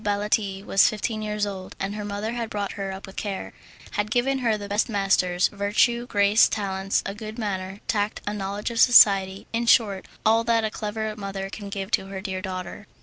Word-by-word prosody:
Baletti 205 -1 0
was 195 - +5
fifteen 215 +1 -3
years 210 -1 -1
old, 190 -2 -7
and 195 +1 -2
her 210 0 -5
mother 205 +2 -3
had 235 -2 -3
brought 205 -1 -3
her 195 -1 -4
up 190 +1 -7
with 190 - -13
care, 200 -2 -4 0.4
had 205 +1 -1
given 255 +3 +1
her 230 -4 +1
the 205 -1 -7
best 205 +4 0
masters, 185 -3 +2
virtue, 210 +4 +1
grace, 205 -1 +4
talents, 195 -2 -1
a 195 - -3
good 215 +1 -8
manner, 195 -3 -4
tact, 210 -2 0
a 205 - -2
knowledge 205 +2 -3
of 230 - -3
society 195 -5 +6
in 235 +1 -1
short, 205 -6 +3 0.2
all 225 +1 +4
that 230 -1 +2
a 215 - -2
clever 215 0 -4
mother 195 -1 -5
can 205 -1 -7
give 195 +1 -5
to 195 -2 0
a - - -3
dear 190 -1 -4
daughter. 185 +1 -6
205 Hz, 205 wpm, -25 LUFS, 195-215 Hz, 0.4 s, society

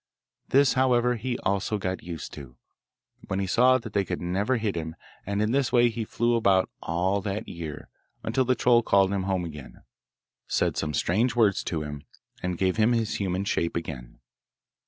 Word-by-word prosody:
This, 140 0 +4
however, 125 -2 +3
he 120 +2 -3
also 100 +2 0
got 95 -2 -3
used 85 -2 -7
to, 65 -4 -10 0.7
when 95 - -2
he 100 - 0
saw 125 +6 +4
that 120 - -9
they 100 - +2
could 90 - -4
never 100 +8 0
hit 110 -4 -2
him, 80 -1 -4 0.3
and 100 +1 0
in 105 - 0
this 135 -1 +1
way 120 -1 +5
he 115 -1 -4
flew 120 +2 0
about 100 -5 +3
all 95 +4 0
that 105 +3 -4
year, 85 -4 -7 0.4
until 115 +4 +1
the 130 0 +2
troll 120 -1 +4
called 100 -3 +3
him 100 - 0
home 95 -2 0
again, 75 -5 -10 0.6
said - - 0
some 75 -2 -2
strange 110 - +1
words 105 -5 +3
to 80 -3 -2
him, 75 -1 -6 0.4
and 90 -1 -2
gave 95 +2 +1
him 110 +2 +4
his 115 -2 0
human 95 0 -1
shape 85 -4 -1
again. 65 -8 -6
100 Hz, 185 wpm, -26 LUFS, 90-120 Hz, 0.7 s, way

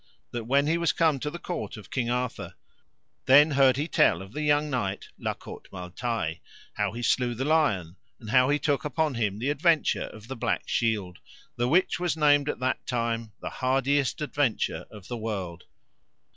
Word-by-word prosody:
That 120 -2 -4
when 140 +4 +3
he 165 +3 +1
was 170 - +2
come 160 -4 +2
to 150 - -3
the 170 - -6
court 175 -7 -5
of 105 - -12
King 120 -3 -1
Arthur, 125 0 -3 0.7
then 145 +4 +7
heard 135 -2 +4
he 150 +3 -1
tell 95 - +3
of 95 +3 -13
the 150 - -3
young 150 0 +2
knight 105 -8 -3
La - - -2
Cote - - -11
Male 90 -2 -8
Taile, 110 -8 -2 0.4
how - - -1
he 120 +2 -6
slew 120 0 +1
the 130 +4 -2
lion, 105 - +1 0.2
and 110 -3 -8
how 130 +2 +5
he 145 - +3
took 145 -1 0
upon 155 0 0
him 105 -4 -1
the 130 +6 -1
adventure 160 +2 +2
of 110 +1 -12
the 135 - -5
black - - -1
shield, 105 -6 -1 0.4
the 120 - 0
which 170 +1 +2
was 175 -3 -1
named 145 -1 +4
at - - -2
that 130 0 -2
time 115 -3 -2
the - - -5
hardiest 135 +1 +1
adventure 145 -5 -1
of 105 -3 -12
the 120 - -4
world. 95 -6 -5
130 Hz, 195 wpm, -27 LUFS, 110-145 Hz, 0.7 s, then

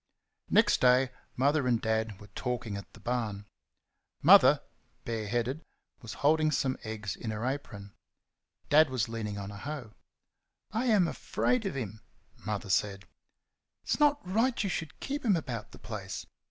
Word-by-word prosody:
Next - - +4
day 125 +1 +5 0.2
Mother 140 +1 +2
and 120 -2 +3
Dad 110 -3 -1
were 105 - -12
talking 120 -4 -3
at 100 - -8
the - - -14
barn. 110 -5 -2 0.8
Mother, - - +7 0.4
bare 115 -2 -3
headed, 120 +7 -1 0.4
was 115 -2 -7
holding 155 +1 +4
some 135 -3 0
eggs 110 -2 -5
in 115 - -6
her 110 +2 -3
apron. 105 -7 -5 0.8
Dad 155 0 +6
was 125 -4 0
leaning 110 -3 -4
on 100 0 -5
a 100 - -9
hoe. 130 -2 -6 0.8
"I 225 +4 -1
am 210 -7 +4
AFRAID 235 +6 0
of 190 - -4
him," 110 -4 -5 0.3
Mother 105 0 -4
said; 100 0 0 0.8
"it's - - -1
not 290 -8 +3
right 230 +6 +1
you 195 - -1
should 160 -3 -4
keep 285 +2 -3
him 215 -6 +4
about 125 -9 -4
the - - -12
place. 100 -4 -6
120 Hz, 155 wpm, -30 LUFS, 105-155 Hz, 0.8 s, Mother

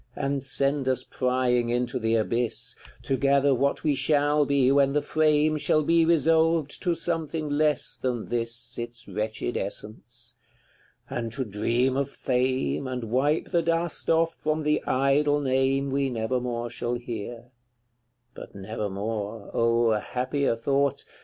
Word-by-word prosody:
And 140 0 -1
send 135 0 0
us 130 - 0
prying 125 -2 0
into 120 +1 -1
the 115 0 +1
abyss, 115 +2 -1 0.3
To 135 - 0
gather 140 +1 +3
what 140 +2 0
we 150 - +2
shall 145 +1 +2
be 135 -2 +3
when 140 0 +3
the 150 - +2
frame 155 0 +2
Shall 155 +1 +2
be 165 +2 +3
resolved 160 -1 +2
to 175 -3 +1
something 165 -2 -2
less 150 -1 +1
than 125 -3 -2
this 120 +1 -3
Its 120 0 -5
wretched 110 +4 -3
essence; 120 +4 -7 0.7
and 115 -1 -4
to 130 0 -3
dream 120 +5 0
of 140 0 0
fame, 130 - -1
And 125 -2 -4
wipe 145 +5 +1
the 170 -2 +3
dust 165 0 -1
from 165 - +4
off 160 -1 -1
the 150 0 +1
idle 140 +2 +2
name 135 0 +1
We 140 0 +1
never 120 +1 -1
more 120 -1 -3
shall 120 0 -3
hear, 120 0 -7 0.8
but - - -11
never 105 +2 -4
more, 105 +1 -4
Oh, 115 0 +2
happier 125 +5 -1
thought! 140 +3 0
130 Hz, 145 wpm, -26 LUFS, 120-145 Hz, 0.8 s, from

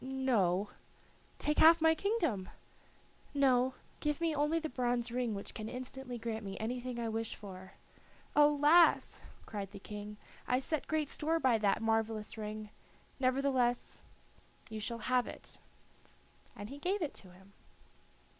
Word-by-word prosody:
"No." 225 -8 +1 0.7
"Take 300 0 0
half 330 +1 +8
my 320 0 +5
kingdom." 320 - -1 0.9
"No. 260 -2 +3 0.2
Give 295 0 -1
me 335 -2 +1
only 300 +3 +2
the 320 -1 -2
bronze 245 -3 -1
ring 240 -3 -1
which 200 - -7
can 215 0 -5
instantly 255 0 -6
grant 225 -1 -4
me 195 -1 -6
anything 245 +2 -3
I 230 - -1
wish 225 0 -2
for." 190 -2 -10 0.6
"Alas!" 295 +3 +5 0.3
said 200 -3 -4
the 200 - -10
King, 210 +1 -8 0.3
"I 250 - +3
set 280 +3 -2
great 310 -2 0
store 320 +3 0
by 250 -6 +3
that 210 +1 +2
marvelous 225 -1 0
ring; 215 -1 -6 0.5
nevertheless, 255 -2 +1 0.7
you 220 - -4
shall 230 +2 -2
have 255 -1 +2
it." - - -7 1.0
And 205 +3 -8
he 280 - -8
gave 370 +4 0
it 295 - -3
to 190 - -8
him. 190 +2 -19
245 Hz, 145 wpm, -34 LUFS, 215-290 Hz, 1.0 s, half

